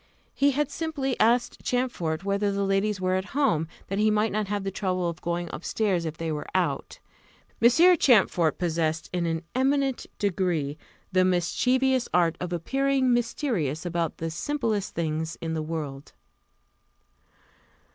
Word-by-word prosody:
He 280 Hz, +1 st, +3 dB
had 285 Hz, +1 st, 0 dB
simply 290 Hz, -5 st, -2 dB
asked 240 Hz, +2 st, +2 dB
Champfort 195 Hz, -10 st, -1 dB
whether 200 Hz, +1 st, 0 dB
the 200 Hz, 0 st, -1 dB
ladies 195 Hz, +1 st, +1 dB
were 185 Hz, 0 st, 0 dB
at 190 Hz, +8 st, -3 dB
home, 165 Hz, -, +2 dB, 0.2 s
that 195 Hz, +1 st, -2 dB
he 215 Hz, +1 st, +4 dB
might 215 Hz, +1 st, +2 dB
not 210 Hz, 0 st, -1 dB
have 205 Hz, 0 st, -2 dB
the 195 Hz, -, -2 dB
trouble 185 Hz, -2 st, -1 dB
of 170 Hz, -1 st, -5 dB
going 175 Hz, +1 st, -2 dB
up -, -, -7 dB
stairs 190 Hz, -6 st, 0 dB
if 160 Hz, -1 st, -4 dB
they 165 Hz, -1 st, -3 dB
were 150 Hz, -1 st, -4 dB
out. -, -, -1 dB, 0.6 s
Monsieur 330 Hz, +10 st, +6 dB
Champfort 195 Hz, -, +3 dB
possessed, 160 Hz, -2 st, -1 dB
in 175 Hz, -1 st, 0 dB
an 165 Hz, 0 st, -2 dB
eminent 270 Hz, 0 st, +1 dB
degree, 175 Hz, -7 st, 0 dB, 0.4 s
the 185 Hz, -1 st, +4 dB
mischievous 250 Hz, +9 st, +1 dB
art 170 Hz, -2 st, +3 dB
of 180 Hz, -1 st, -3 dB
appearing 265 Hz, -, +1 dB
mysterious 225 Hz, -, -1 dB
about 170 Hz, -2 st, -2 dB
the 165 Hz, 0 st, -3 dB
simplest 215 Hz, -, -2 dB
things 160 Hz, 0 st, -2 dB
in 165 Hz, -1 st, -3 dB
the 160 Hz, -, -1 dB
world. 150 Hz, -3 st, -5 dB
190 Hz, 155 wpm, -26 LUFS, 165-245 Hz, 0.6 s, Monsieur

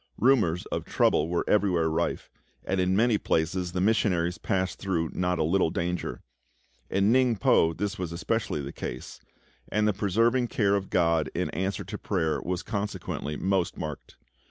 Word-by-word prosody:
Rumours 110 Hz, -9 st, +3 dB
of -, -, -2 dB
trouble 75 Hz, +2 st, +2 dB
were 85 Hz, -, -1 dB
everywhere 90 Hz, -6 st, +2 dB
rife, 80 Hz, +2 st, -2 dB, 0.3 s
and 95 Hz, 0 st, 0 dB
in 90 Hz, +1 st, +1 dB
many 110 Hz, 0 st, +3 dB
places 90 Hz, +2 st, 0 dB
the 90 Hz, -, -1 dB
missionaries 90 Hz, -4 st, +1 dB
passed 95 Hz, -1 st, -1 dB
through 85 Hz, -5 st, -1 dB
not 90 Hz, -1 st, 0 dB
a 80 Hz, -, +1 dB
little 85 Hz, +2 st, +2 dB
danger. 85 Hz, +1 st, -3 dB, 0.7 s
In 100 Hz, +3 st, +3 dB
Ningpo 115 Hz, -10 st, +3 dB
this 105 Hz, 0 st, -3 dB
was 90 Hz, -3 st, -3 dB
especially 90 Hz, -3 st, -2 dB
the 70 Hz, -, -6 dB
case, -, -, -7 dB, 0.5 s
and 105 Hz, 0 st, +2 dB
the 105 Hz, -, +2 dB
preserving 115 Hz, +6 st, +2 dB
care 100 Hz, -3 st, +1 dB
of 100 Hz, -1 st, -1 dB
GOD 85 Hz, -3 st, +2 dB
in -, -, -1 dB
answer 95 Hz, +2 st, -2 dB
to 105 Hz, +3 st, -7 dB
prayer 80 Hz, -6 st, -1 dB
was 90 Hz, +1 st, -3 dB
consequently 100 Hz, -8 st, -4 dB
most 95 Hz, -2 st, 0 dB
marked. -, -, -7 dB
95 Hz, 160 wpm, -27 LUFS, 85-105 Hz, 0.7 s, Rumours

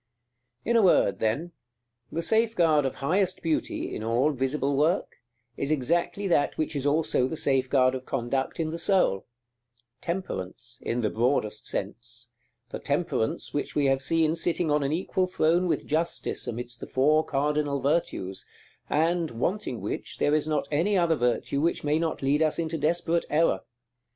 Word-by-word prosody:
§ -, -, -35 dB
VII. 235 Hz, -, -1 dB
In -, -, +3 dB
a -, -, +5 dB
word, 100 Hz, -, +4 dB
then, 130 Hz, +11 st, -1 dB, 0.6 s
the 165 Hz, -, -2 dB
safeguard 175 Hz, -9 st, +3 dB
of 130 Hz, -, -5 dB
highest 185 Hz, +7 st, 0 dB
beauty, 160 Hz, -2 st, -1 dB
in -, -, -5 dB
all 120 Hz, +6 st, +2 dB
visible 135 Hz, +1 st, -1 dB
work, 160 Hz, +7 st, +1 dB, 0.4 s
is 140 Hz, -, -2 dB
exactly 170 Hz, +7 st, 0 dB
that 155 Hz, -5 st, +1 dB
which 155 Hz, -1 st, -2 dB
is 140 Hz, 0 st, 0 dB
also 145 Hz, -4 st, +2 dB
the 160 Hz, -, -5 dB
safeguard 130 Hz, -2 st, +2 dB
of 130 Hz, 0 st, -6 dB
conduct 130 Hz, +3 st, -2 dB
in 160 Hz, -1 st, -1 dB
the 165 Hz, -, -4 dB
soul, 175 Hz, -, +2 dB, 0.7 s
Temperance, 120 Hz, -, -5 dB
in 120 Hz, +1 st, -1 dB
the 110 Hz, -, 0 dB
broadest 110 Hz, -3 st, 0 dB
sense; 120 Hz, +4 st, -5 dB, 0.4 s
the -, -, -5 dB
Temperance 145 Hz, -6 st, -1 dB
which 145 Hz, -, -3 dB
we 145 Hz, -, +2 dB
have 135 Hz, 0 st, +2 dB
seen 160 Hz, +3 st, +2 dB
sitting 170 Hz, -1 st, 0 dB
on 150 Hz, 0 st, +3 dB
an 140 Hz, 0 st, -1 dB
equal 185 Hz, +2 st, 0 dB
throne 175 Hz, +1 st, +2 dB
with 170 Hz, -, -1 dB
Justice 165 Hz, +3 st, -1 dB
amidst 120 Hz, +1 st, -5 dB
the -, -, -7 dB
Four 150 Hz, +4 st, +3 dB
Cardinal 145 Hz, 0 st, 0 dB
Virtues, 135 Hz, -, -1 dB, 0.4 s
and, 165 Hz, +2 st, +1 dB
wanting 125 Hz, -, -2 dB
which, -, -, -4 dB
there 145 Hz, -, +2 dB
is 155 Hz, 0 st, +2 dB
not 150 Hz, -2 st, 0 dB
any 180 Hz, +7 st, +2 dB
other 170 Hz, -2 st, +3 dB
virtue 125 Hz, +2 st, 0 dB
which 170 Hz, +2 st, 0 dB
may 150 Hz, +1 st, +1 dB
not 165 Hz, -4 st, -2 dB
lead 145 Hz, +3 st, +2 dB
us 155 Hz, -1 st, +2 dB
into 165 Hz, -1 st, -2 dB
desperate 170 Hz, +2 st, +1 dB
error. 160 Hz, +2 st, +2 dB
150 Hz, 170 wpm, -27 LUFS, 130-165 Hz, 0.7 s, a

